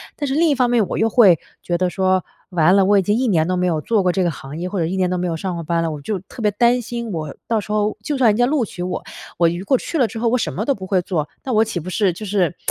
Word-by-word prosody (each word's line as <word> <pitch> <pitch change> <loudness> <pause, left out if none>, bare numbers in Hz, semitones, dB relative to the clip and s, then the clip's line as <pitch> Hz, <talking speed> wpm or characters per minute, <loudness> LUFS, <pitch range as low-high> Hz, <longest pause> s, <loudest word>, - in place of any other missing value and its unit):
但 290 - -3
是 270 - -1
另 330 +4 +3
一 290 - +2
方 250 -2 +2
面 235 -5 +2
我 - - -3
又 225 - +2
会 205 -7 +6 0.2
觉 175 - -1
得 180 +1 +1
说： 185 0 +1 0.3
“完 175 0 +4
了， 195 - +4
我 205 +1 +4
已 - - +4
经 205 +4 +1
1 260 - +1
年 165 -7 +2
都 185 +2 -1
没 180 0 +1
有 160 -3 0
做 220 +5 +1
过 180 -1 +2
这 190 - +1
个 175 - +1
行 140 0 -9
业， 180 +2 -4
或 195 - -3
者 165 - +1
1 175 +4 -2
年 185 -1 +1
都 180 - -1
没 180 0 -1
有 165 - -2
上 185 +3 -3
过 170 -1 -5
班 170 +1 0
了。” 165 - -1
我 150 - -6
就 195 +9 -3
特 195 +6 -11
别 210 - +3
担 240 +4 +3
心 235 -1 -5
我 155 -5 -5
到 225 -2 +2
时 210 +1 -5
候 210 0 0
就 290 +6 -2
算 250 -4 +4
人 210 - +2
家 245 - +4
录 275 0 +1
取 185 -4 -7
我， 180 +1 -3 0.3
我 170 -1 +4
如 175 +3 -5
果 265 +5 +3
去 330 - -4
了 255 -5 +3
之 225 - -8
后， 230 +1 +1
我 250 - +2
什 235 - -2
么 210 - -2
都 280 - +1
不 190 -6 -8
会 185 -1 +2
做， 165 -4 -2 0.2
那 265 - -3
我 220 -2 +4
岂 220 -4 -5
不 175 - -7
是 185 0 +1
就 215 +5 -8
是 190 -4 0
195 Hz, 355 characters per minute, -20 LUFS, 175-230 Hz, 0.3 s, 会